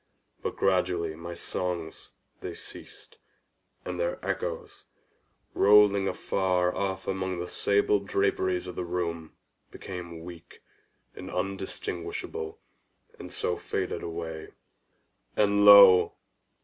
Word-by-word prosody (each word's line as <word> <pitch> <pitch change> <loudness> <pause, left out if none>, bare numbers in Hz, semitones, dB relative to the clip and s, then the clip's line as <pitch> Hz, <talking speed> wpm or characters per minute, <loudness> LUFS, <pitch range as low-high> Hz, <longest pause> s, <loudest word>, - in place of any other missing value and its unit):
But - - -3
gradually 90 -3 +1
my 85 +2 -8
songs 85 -2 -4 0.3
they - - -6
ceased, - - -10 0.7
and 90 -1 -5
their 85 0 -1
echoes, - - -4 0.7
rolling 100 -1 +5
afar 90 -3 0
off 95 -1 -3
among 95 -1 -2
the 90 +1 -4
sable 100 +2 +2
draperies 95 -2 0
of 90 -1 -7
the 90 - -3
chamber, 85 -2 -3 0.4
became 85 -3 -8
weak, 85 -1 -12 0.5
and 90 - -8
undistinguishable, 90 -4 -4 0.6
and - - -9
so - - -1
faded - - -3
away. 80 -1 -6 0.9
And 100 0 +3
lo! 100 -3 +9
90 Hz, 105 wpm, -28 LUFS, 85-95 Hz, 0.9 s, lo